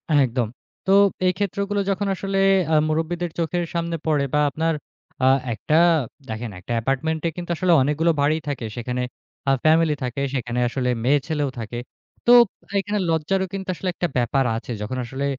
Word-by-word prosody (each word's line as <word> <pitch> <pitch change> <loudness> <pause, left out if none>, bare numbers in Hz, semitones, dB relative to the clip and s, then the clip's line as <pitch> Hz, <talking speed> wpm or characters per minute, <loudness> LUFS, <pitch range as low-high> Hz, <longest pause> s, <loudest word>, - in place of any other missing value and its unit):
একদম। 125 -4 +2 0.4
তো 190 - +1 0.3
এই 185 - +5
ক্ষেত্রগুলো 200 +1 -1
যখন 200 +1 0
আসলে 195 +1 -3 0.4
আ - - +5
মুরুব্বিদের 165 +2 -1
চোখের 175 +1 0
সামনে 170 0 -1
পড়ে 150 -3 +2
বা 150 - +3
আপনার 160 +3 0 0.5
আ - - +5 0.3
একটা 150 +7 -1 0.5
দেখেন 110 +1 -4
একটা 95 - -9
অ্যাপার্টমেন্টে 150 +7 0
কিন্তু 175 -1 -6
আসলে 180 +2 +1
অনেকগুলো 150 +5 +2
বাড়ি 150 +2 +3
থাকে। 140 -5 -3
সেখানে 125 +1 -3 0.5
আ - - +5
ফ্যামিলি 155 -1 +4
থাকে, 125 +2 -3
সেখানে 125 -2 -2
আসলে 125 +1 -1 0.2
মেয়ে-ছেলেও 145 +1 +1
থাকে। 115 +2 -5 0.5
তো 240 - +5 0.5
এখানে 205 +1 -1
লজ্জারও 165 +4 +1
কিন্তু 190 -1 -5
আসলে 185 - -3
একটা 175 - 0
ব্যাপার 130 +3 +2
আছে। 120 - -7
যখন 110 +5 -3
আসলে 135 +3 -4
155 Hz, 160 wpm, -23 LUFS, 130-175 Hz, 0.5 s, এই